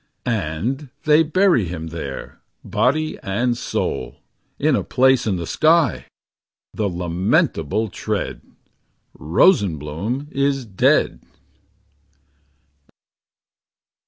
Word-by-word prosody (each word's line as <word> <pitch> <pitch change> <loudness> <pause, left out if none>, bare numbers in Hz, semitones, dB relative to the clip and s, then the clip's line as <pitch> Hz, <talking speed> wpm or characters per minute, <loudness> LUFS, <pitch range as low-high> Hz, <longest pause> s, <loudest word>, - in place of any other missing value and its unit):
And 115 - -2
they 155 +1 +5
bury 165 - +3
him 80 -1 -6
there. 75 -5 -7 0.2
Body 155 +1 0
and 120 +5 0
soul. - - -3 0.4
In - - +2
a - - 0
place 130 -2 +3
in 100 - +1
the 85 -2 -4
sky. 155 - +2 0.7
The 105 -2 -1
lamentable 90 - 0
tread! 95 - -4 0.7
Rosenbloom 90 - +1
is 140 -1 0
dead. 95 -4 +2
110 Hz, 85 wpm, -21 LUFS, 85-140 Hz, 0.7 s, they